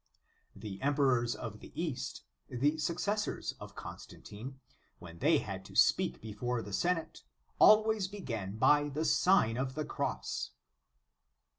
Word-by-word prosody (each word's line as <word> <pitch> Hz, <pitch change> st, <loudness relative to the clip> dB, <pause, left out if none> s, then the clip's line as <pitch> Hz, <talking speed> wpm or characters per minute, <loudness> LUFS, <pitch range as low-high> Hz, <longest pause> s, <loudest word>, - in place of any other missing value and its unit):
The 100 Hz, -1 st, -8 dB
emperors 130 Hz, -4 st, +2 dB
of 105 Hz, -1 st, -7 dB
the -, -, -12 dB
East, 130 Hz, -7 st, -3 dB, 0.3 s
the 145 Hz, +5 st, +1 dB
successors 200 Hz, +7 st, -1 dB
of -, -, -10 dB
Constantine, 130 Hz, +6 st, -9 dB, 0.4 s
when 85 Hz, -1 st, -12 dB
they -, -, +4 dB
had -, -, -5 dB
to -, -, -13 dB
speak 65 Hz, 0 st, +3 dB
before 115 Hz, -, -3 dB
the 100 Hz, -, -8 dB
Senate, 175 Hz, -, -1 dB, 0.4 s
always 215 Hz, -2 st, +6 dB
began 115 Hz, -, -5 dB
by 145 Hz, +5 st, +4 dB
the 150 Hz, +3 st, -2 dB
Sign 150 Hz, -, +4 dB
of 130 Hz, 0 st, -2 dB
the 155 Hz, 0 st, -2 dB
Cross. -, -, -3 dB
130 Hz, 130 wpm, -32 LUFS, 110-160 Hz, 0.4 s, always